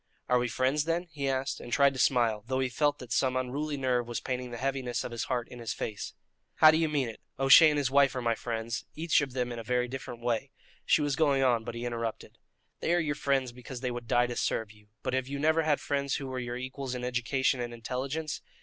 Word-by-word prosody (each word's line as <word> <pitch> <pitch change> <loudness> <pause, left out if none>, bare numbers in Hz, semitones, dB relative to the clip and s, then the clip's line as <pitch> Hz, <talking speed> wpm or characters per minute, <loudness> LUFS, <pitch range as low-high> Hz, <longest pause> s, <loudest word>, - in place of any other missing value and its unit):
"Are 125 0 +4
we 125 - 0
friends, 130 +6 +1
then?" 165 +1 0
he 140 -3 -2
asked, 135 +1 -1
and 120 - -9
tried 140 +1 +4
to 130 - -6
smile, 115 -5 +2
though 130 0 0
he 130 -1 +1
felt 145 +3 +1
that 125 -4 -11
some 130 +1 +2
unruly 140 +4 -2
nerve 125 -3 0
was 120 - -3
painting 125 -1 -3
the 120 - -6
heaviness 130 -1 -2
of - - -5
his 120 - -3
heart 125 -2 -2
in 125 - -11
his 115 -2 -3
face. 105 -2 -5 0.4
"How 155 - +8
do 155 - +2
you 160 -1 +1
mean 145 -4 0
it? 115 - -9 0.2
O'Shea 135 +4 +8
and 150 - 0
his 140 -2 0
wife 140 -1 +4
are 130 - -2
my 115 -1 +2
friends, 115 0 -3
each 160 0 +2
of 135 -4 -4
them 125 -1 -1
in 120 - -5
a - - -6
very 125 +1 0
different 125 -2 -7
way 120 -2 0 0.2
" - - -30
She 150 - +4
was 145 -2 0
going 140 -3 +3
on, 120 -3 +3
but 115 - -6
he 120 +1 -4
interrupted: 115 -2 -4 0.4
"They 170 - +1
are - - +3
your 155 -3 0
friends 135 -3 0
because 125 +1 -9
they 125 -1 -1
would 120 -1 -6
die 120 +1 +3
to 120 0 -4
serve 110 -2 -1
you; 105 -1 -20 0.2
but - - -2
have 130 -1 0
you 140 +1 -4
never 160 +3 +3
had 155 -2 +2
friends 140 -1 -1
who 140 - -4
were 130 -1 -4
your 120 -1 -4
equals 130 0 -5
in 125 - -5
education 125 +2 0
and 120 -1 -3
intelligence?" 135 +6 -4
130 Hz, 260 wpm, -29 LUFS, 120-140 Hz, 0.4 s, How